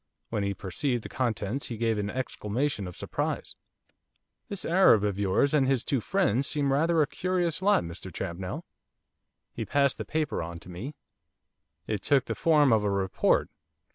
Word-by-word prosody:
When 110 -2 0
he 100 0 -1
perceived 115 +7 -2
the - - -7
contents 120 0 -2
he 115 - -5
gave 115 -1 +1
an 100 0 -2
exclamation 125 -1 -2
of 90 - -9
surprise. - - -3 0.9
'This 200 - -4
Arab 165 - +5
of 100 -1 -1
yours, 100 +9 +2
and 140 -3 +4
his 135 -3 +2
two 135 -4 0
friends, 140 - +1
seem 140 -2 0
rather 160 +2 +3
a - - +2
curious 175 0 -1
lot, 205 - +4
Mr 85 +2 -7
Champnell.' 90 +1 -5 0.9
He - - -3
passed 140 -2 +1
the - - -2
paper 155 -1 -1
on 85 +1 -5
to 90 - -13
me. 110 +12 -6 0.9
It 105 -3 -2
took 135 +4 +3
the - - -2
form 150 -6 +4
of 110 -2 +3
a 105 - +1
report. 95 -1 +1
120 Hz, 170 wpm, -28 LUFS, 100-145 Hz, 0.9 s, Arab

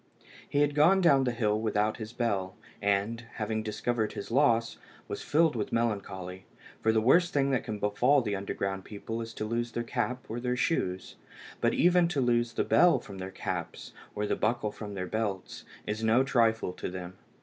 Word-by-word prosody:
He 145 - +2
had 145 0 +2
gone 160 +6 +5
down 155 -7 +5
into 130 -2 +1
the 120 - -5
hill 105 -2 +1
without 110 -1 0
his 110 0 -7
bell, 100 -6 -1 0.3
and, 100 +3 0
having 110 0 -2
discovered 110 +1 -2
his 100 - -7
loss, 115 -3 +2 0.3
was - - -5
filled 155 -1 +2
with 105 -3 -3
melancholy, 95 -5 -2 0.4
for 110 - +3
the 110 - +3
worst 170 +10 +4
thing 140 -1 +2
that 130 - +1
can 110 -2 -4
befall 120 +7 +3
the 105 -3 -1
underground 95 0 -3
people 110 +3 -6
is 115 0 -6
to 110 - -3
lose 115 +1 -2
their 120 - -2
cap, 125 +1 -2
or 115 +2 -4
their 125 0 -1
shoes; 95 - -1 0.4
but - - +2
even 175 0 +4
to 170 -5 -1
lose 120 -2 +1
the - - 0
bell 175 0 +5
from 100 -2 -9
their 95 0 -5
caps, 95 - -5 0.2
or 105 - -1
the - - 0
buckle 110 -1 0
from 105 -2 -8
their 95 -1 -3
belts, 100 -2 -3 0.2
is 110 +2 -3
no 115 +4 +4
trifle 115 -7 +2
to - - -5
them. 90 0 -7
115 Hz, 195 wpm, -29 LUFS, 105-125 Hz, 0.4 s, gone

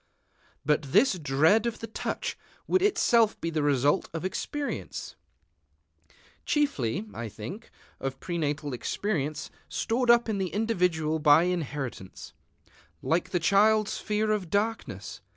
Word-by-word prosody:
But 150 +1 +3
this 205 -2 +4
dread 160 - +3
of 235 - -3
the - - -6
touch 225 - -4 0.3
would 370 - +2
itself 235 - +3
be 165 - -3
the 155 -1 0
result 145 -1 +2
of 165 - -3
experience, 285 +9 -4 1.3
chiefly, 140 - 0
I 115 +2 -5
think, 115 - -8 0.3
of 135 0 -4
prenatal 150 -4 -2
experience 155 - -2 0.2
stored 240 +2 -1
up 235 0 +6
in 215 -3 -1
the 190 - 0
individual 180 -8 +1
by 150 +2 +6
inheritance, 145 - -4 0.7
like 165 +2 0
the 180 - 0
child's 210 +5 +3
fear 215 0 0
of 200 -5 -1
darkness. 200 - -2
180 Hz, 125 wpm, -28 LUFS, 145-220 Hz, 1.3 s, up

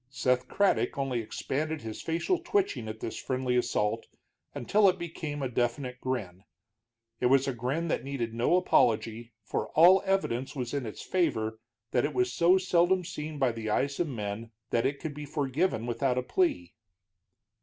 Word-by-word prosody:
Seth 130 -2 0
Craddock 165 - +1
only 135 -3 -1
expanded 150 +7 -3
his 110 -1 -6
facial 170 - 0
twitching 385 - 0
at 110 0 -7
this - - -4
friendly 130 -1 -1
assault 115 -2 0 0.5
until 200 - +4
it 185 - 0
became 155 -4 -5
a - - +1
definite 125 +1 -2
grin. 100 -8 -3 0.8
It 125 - +3
was 135 +1 +4
a 135 - 0
grin 130 +8 -2
that - - 0
needed 130 -5 -3
no 120 +9 +2
apology, 115 -9 +2
for - - -2
all 180 +4 +7
evidence 160 -10 -1
was 125 -2 -4
in 140 -5 -2
its 110 - -7
favor 110 -12 0 0.3
that 125 - +2
it 145 -1 -2
was 125 -1 +1
so 175 +3 +5
seldom 180 0 +2
seen 155 -3 -5
by 130 -3 +2
the 115 -1 -5
eyes 140 +6 0
of 175 - +1
men 110 -3 -4 0.2
that 120 +2 +2
it 140 0 -3
could 155 - -5
be 150 +1 -7
forgiven 140 -3 0
without 125 +2 0
a 125 - 0
plea. 125 - 0
130 Hz, 175 wpm, -29 LUFS, 115-160 Hz, 0.8 s, all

